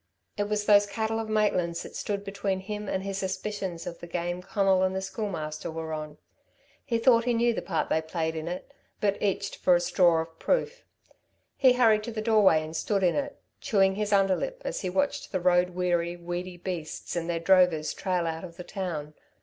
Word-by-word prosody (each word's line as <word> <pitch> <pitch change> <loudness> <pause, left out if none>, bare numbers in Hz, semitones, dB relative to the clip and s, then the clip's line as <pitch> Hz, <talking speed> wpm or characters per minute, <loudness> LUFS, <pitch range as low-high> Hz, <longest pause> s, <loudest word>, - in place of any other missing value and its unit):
It 205 0 -2
was 210 -1 0
those 205 -1 +6
cattle 220 +2 -2
of 220 -1 -4
Maitland's 185 -6 +1
that - - -10
stood 200 -1 -3
between 195 -1 -2
him 210 +1 -5
and 190 - -1
his 195 -1 -3
suspicions 190 -2 -4
of 170 - -6
the 170 - -9
game 175 +1 -3
Conal 195 0 +2
and 190 0 +1
the - - 0
Schoolmaster 190 -7 -4
were 160 0 -5
on. 155 -1 -6 0.7
He 235 -4 0
thought 230 0 +4
he 245 -1 +2
knew 235 +1 +3
the - - -3
part 170 -4 -2
they 160 - +2
played 160 0 -2
in 160 0 -4
it, 180 +10 -6 0.3
but 200 -1 0
itched 200 -2 -1
for 180 - +4
a - - +3
straw 175 -1 +3
of 165 0 -17
proof. - - 0 0.7
He 260 -3 +5
hurried 225 -4 +4
to 235 - -4
the 220 - -4
doorway 215 -8 +4
and 155 +1 -7
stood 195 +3 0
in 175 - +4
it, 285 0 -3 0.2
chewing 195 -3 +3
his 210 +1 -2
underlip, 200 - +1
as - - -3
he 185 - -2
watched 285 +8 -1
the 185 - 0
road 180 0 +3
weary, 175 -1 0
weedy 175 +1 -5
beasts 175 -3 -5
and 170 0 -2
their 170 -1 0
drovers 170 -3 +3
trail 180 -2 -1
out 165 +1 -3
of 170 -2 -9
the 180 - -7
town. 165 -6 -5
190 Hz, 205 wpm, -27 LUFS, 170-210 Hz, 0.7 s, those